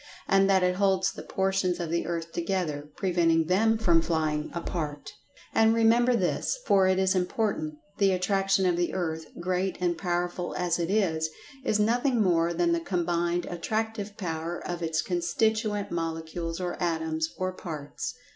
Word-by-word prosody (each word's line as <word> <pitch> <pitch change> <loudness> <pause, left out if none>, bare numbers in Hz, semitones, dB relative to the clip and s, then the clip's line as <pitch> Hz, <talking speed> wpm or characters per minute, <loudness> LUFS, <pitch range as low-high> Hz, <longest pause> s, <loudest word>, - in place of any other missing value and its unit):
And 195 0 +4
that 190 -1 +4
it 180 0 +1
holds 190 -1 +2
the - - -9
portions 190 -2 0
of 170 -2 -3
the 170 -1 0
earth 165 -1 -3
together, 165 -5 -2
preventing 170 -3 +2
them 220 +6 +3
from 175 -7 +3
flying 155 -2 -1
apart. 155 -3 -4 0.4
And, 225 0 +4
remember 235 +2 +4
this, 195 - 0
for 195 -1 +4
it 185 0 +3
is 190 0 +3
important—the 195 0 -1
Attraction 195 +1 +2
of 175 -1 +2
the 175 +1 -1
Earth, 160 -3 -2
great 185 +2 -1
and 175 -1 +1
powerful 175 0 -2
as 175 -1 0
it 170 0 -1
is, 165 -6 +1 0.3
is 215 -5 +1
nothing 240 +4 +2
more 170 -4 +3
than 340 - +1
the 340 - +2
combined 175 - 0
attractive 215 +4 -3
power 165 -2 -3
of 175 -1 -4
its 160 -1 0
constituent 205 +4 0
molecules, 165 0 -3
or 180 0 -4
atoms, 160 -2 -1
or 185 0 -1
parts. 155 -6 -6
180 Hz, 155 wpm, -27 LUFS, 165-195 Hz, 0.4 s, And